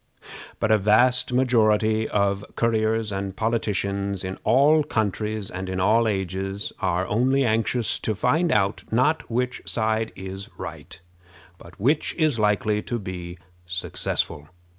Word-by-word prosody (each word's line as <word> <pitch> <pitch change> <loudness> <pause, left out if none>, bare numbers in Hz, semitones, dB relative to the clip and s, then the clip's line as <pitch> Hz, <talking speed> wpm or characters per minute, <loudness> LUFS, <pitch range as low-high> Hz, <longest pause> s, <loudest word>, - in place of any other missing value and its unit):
But 110 - +1
a 110 - +5
vast 115 +6 +3
majority 110 -3 +2
of 100 -1 +1
courtiers 110 -1 +1
and 95 -1 -4
politicians 100 -3 -1
in 95 0 -5
all 140 +7 +5
countries 110 -2 -2
and 95 +1 -5
in 95 0 -2
all 110 +5 +3
ages 95 0 -3
are 90 0 0
only 130 +6 +2
anxious 115 +1 0
to 110 - -2
find 155 - +1
out, 100 -1 +1
not 130 +8 +1
which 125 +2 -1
side 110 0 0
is 95 +1 -7
right, - - -8 0.6
but 85 +2 -15
which 145 +9 +1
is 155 -8 +1
likely 105 0 +1
to 120 - -3
be 90 -4 -7 0.3
successful. 85 -4 -2
110 Hz, 135 wpm, -24 LUFS, 95-115 Hz, 0.6 s, a